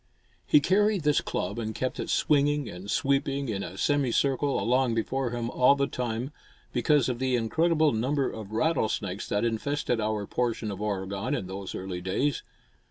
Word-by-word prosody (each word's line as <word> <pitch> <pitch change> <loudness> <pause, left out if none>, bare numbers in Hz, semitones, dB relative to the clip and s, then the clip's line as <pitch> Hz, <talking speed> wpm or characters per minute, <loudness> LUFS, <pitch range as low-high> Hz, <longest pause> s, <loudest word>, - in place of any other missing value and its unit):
He - - +6
carried 200 +3 +2
this 150 -1 +3
club - - -3
and 110 -1 -4
kept 130 - -2
it - - -3
swinging 145 -2 +2
and 90 +3 -8
sweeping 140 0 0
in 100 -3 -2
a - - -7
semi 145 -4 +1
circle 140 +2 +1
along 125 0 +2
before 130 +3 -1
him 120 0 -3
all 130 +2 +5
the 140 0 +1
time 125 0 -3 0.4
because 150 -5 +3
of 125 -2 -2
the 130 -1 +1
incredible 155 +7 +2
number 130 +5 0
of 110 -2 -7
rattlesnakes 110 - -1
that 105 +3 +1
infested 120 +1 -1
our 105 -1 -1
portion 115 -1 -1
of 100 +1 -6
Oregon 100 +4 -2
in 100 - -3
those 95 +1 -6
early 95 -1 -5
days. 115 +10 0
125 Hz, 170 wpm, -27 LUFS, 110-140 Hz, 0.4 s, He